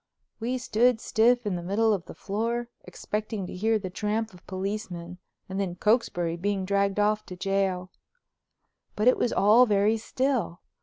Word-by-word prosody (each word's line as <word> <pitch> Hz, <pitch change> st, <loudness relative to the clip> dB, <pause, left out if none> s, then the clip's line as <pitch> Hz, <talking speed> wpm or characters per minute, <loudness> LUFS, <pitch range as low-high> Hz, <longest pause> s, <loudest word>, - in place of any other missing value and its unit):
We 245 Hz, +3 st, -1 dB
stood 245 Hz, -1 st, +2 dB
stiff 240 Hz, +2 st, +2 dB
in 200 Hz, -3 st, -1 dB
the 175 Hz, -, -4 dB
middle 210 Hz, +5 st, +2 dB
of 185 Hz, -4 st, -3 dB
the -, -, -10 dB
floor, 230 Hz, +4 st, -2 dB, 0.2 s
expecting 210 Hz, -1 st, -4 dB
to -, -, -8 dB
hear 220 Hz, +4 st, +2 dB
the 190 Hz, -3 st, -6 dB
tramp 215 Hz, +2 st, -2 dB
of 180 Hz, -, -17 dB
policemen 185 Hz, -3 st, -5 dB, 0.3 s
and 190 Hz, +1 st, -4 dB
then 185 Hz, -3 st, -2 dB
Cokesbury 175 Hz, -5 st, +1 dB
being 195 Hz, +1 st, -1 dB
dragged 200 Hz, +1 st, +1 dB
off 210 Hz, +1 st, +2 dB
to 180 Hz, -, -7 dB
jail. 190 Hz, -1 st, -1 dB, 1.0 s
But 215 Hz, +3 st, +1 dB
it 250 Hz, -, +6 dB
was 240 Hz, -, +1 dB
all 220 Hz, +5 st, +5 dB
very 210 Hz, +1 st, +3 dB
still. 250 Hz, -5 st, -1 dB
205 Hz, 165 wpm, -27 LUFS, 190-225 Hz, 1.0 s, it